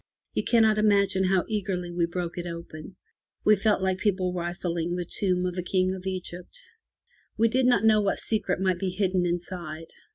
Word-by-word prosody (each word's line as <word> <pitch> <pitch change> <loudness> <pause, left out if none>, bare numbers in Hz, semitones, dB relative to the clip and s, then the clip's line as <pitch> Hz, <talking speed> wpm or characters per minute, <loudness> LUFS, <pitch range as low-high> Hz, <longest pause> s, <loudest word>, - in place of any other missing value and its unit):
You - - -1
cannot 220 -2 +4
imagine 200 -2 +3
how 185 -1 +2
eagerly 190 -5 -2
we 175 -1 0
broke 175 0 -4
it 175 -1 -5
open. 170 +1 -8 0.5
We 215 - +7
felt 205 -1 +1
like 190 0 0
people 185 -3 0
rifling 175 -1 -2
the 180 -1 -3
tomb 180 0 0
of 180 0 -2
a - - 0
King 185 +1 +1
of 190 0 -7
Egypt. 185 - -6 0.8
We 230 - +4
did 250 +2 +2
not 225 -4 +3
know 215 -1 +5
what 200 -1 0
secret 210 -5 -1
might 185 -2 +1
be 190 - -1
hidden 185 -1 0
inside. 170 -2 -5
185 Hz, 185 wpm, -26 LUFS, 175-200 Hz, 0.8 s, We